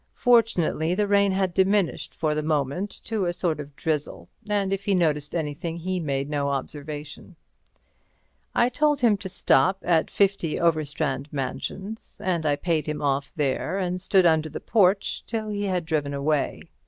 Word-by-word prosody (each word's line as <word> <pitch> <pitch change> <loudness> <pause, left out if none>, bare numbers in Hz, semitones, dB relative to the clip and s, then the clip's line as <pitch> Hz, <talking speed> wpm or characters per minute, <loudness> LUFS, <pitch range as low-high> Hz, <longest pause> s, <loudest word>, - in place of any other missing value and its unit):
Fortunately 205 -9 +2
the 205 +1 +1
rain 200 -1 +4
had 190 -2 0
diminished 190 -1 +1
for 155 -2 0
the 155 - -1
moment 150 +5 -1
to 215 -4 -1
a 175 - 0
sort 170 -3 -1
of 145 -1 -8
drizzle, 150 -2 -3 0.2
and 200 -2 +1
if 195 0 -3
he 200 - +2
noticed 150 -4 0
anything 165 +1 -3
he 185 +2 -2
made 140 -4 -2
no 145 -1 -1
observation. 150 +4 -6 1.2
I 240 - +4
told 295 +2 +1
him 230 -4 +5
to 190 -1 -7
stop 185 +2 +3
at 165 -2 +2
50 195 -6 +1
Overstrand 145 -4 0
Mansions, 190 - -5
and 170 -4 0
I 145 - +3
paid 160 0 -1
him 150 -1 -3
off 140 0 0
there, 150 +5 -1
and 180 -1 -2
stood 190 -1 +3
under 160 -2 +3
the - - -6
porch 195 -3 +2
till 220 -2 -3
he 205 -1 -2
had 180 -3 -1
driven 145 -3 -1
away. 145 +1 0
170 Hz, 165 wpm, -25 LUFS, 150-195 Hz, 1.2 s, him